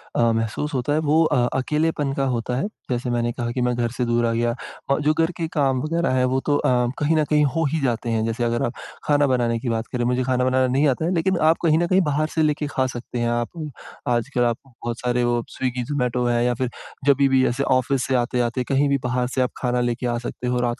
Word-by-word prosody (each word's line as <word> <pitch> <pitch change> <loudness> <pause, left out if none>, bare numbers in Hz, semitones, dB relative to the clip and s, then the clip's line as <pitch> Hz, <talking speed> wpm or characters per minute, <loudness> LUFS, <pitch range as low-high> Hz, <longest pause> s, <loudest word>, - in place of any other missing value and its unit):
अ, - - +2
महसूस 115 +7 -2
होता 130 +2 0
है 155 - +2
वो 160 +2 +5
अ, 150 - +1 0.2
अकेलेपन 150 +1 0
का 135 0 0
होता 120 +1 -2
है। 185 - -1 0.2
जैसे 125 0 -1
मैंने 120 0 0
कहा 120 0 -3
कि 125 - -2
मैं 125 0 +1
घर 120 -1 0
से 125 0 -2
दूर 120 0 +1
आ 115 - +1
गया 120 +1 +1 0.4
और 140 - +2
जो 150 +1 +3
घर 165 +2 +1
के 165 - -2
काम 135 -4 +2
वग़ैरह 165 +2 0
है 130 0 +3
वो 130 - +2
तो 145 - +2
अ, - - +1 0.3
कहीं 150 +2 +2
न 155 - +3
कहीं 150 -1 +4
हो 165 - +1
ही 160 - 0
जाते 120 -2 -1
हैं, 110 -1 0
जैसे 115 +1 -2
अगर 120 0 0
आप 120 - -3 0.3
खाना 145 -1 +3
बनाने 120 -3 +1
की 120 - -3
बात 115 0 -2
करें, 125 -1 -1
मुझे 125 +1 +1
खाना 125 0 +1
बनाना 130 0 +2
नहीं 140 +3 +3
आता 140 +3 0
है 175 - 0
लेकिन 185 +2 +1
आप 165 - +3
कहीं 160 -2 +4
न 175 - +1
कहीं 185 +2 +4
बाहर 155 -2 0
से 160 - +3
लेके 150 -1 0
खा 130 -2 0
सकते 120 0 -6
हैं 120 0 +1
आप। 130 +7 -3 0.4
आजकल 125 +1 +1
आप 120 -1 +1
बहुत 120 -2 -6
सारे 125 0 0
वो 120 -1 +1
स्विगी 125 -1 -2
ज़ोमैटो 125 -2 -1
है 120 0 +2
या 125 - +2
फिर 125 +1 -2 0.4
जभी 140 -1 +4
भी 130 -1 +4
ऐसे 125 +3 -1
ऑफ़िस 130 0 +1
से 130 - +1
आते-आते 125 0 0
कहीं 140 +3 +1
भी 140 - +3
बाहर 125 0 0
से 130 +1 -1
आप 125 - 0
खाना 125 -1 0
लेके 120 +1 -1
आ 120 0 0
सकते 125 - -5
हो 125 0 0
रात 120 -1 -1
125 Hz, 260 wpm, -22 LUFS, 120-145 Hz, 0.4 s, वो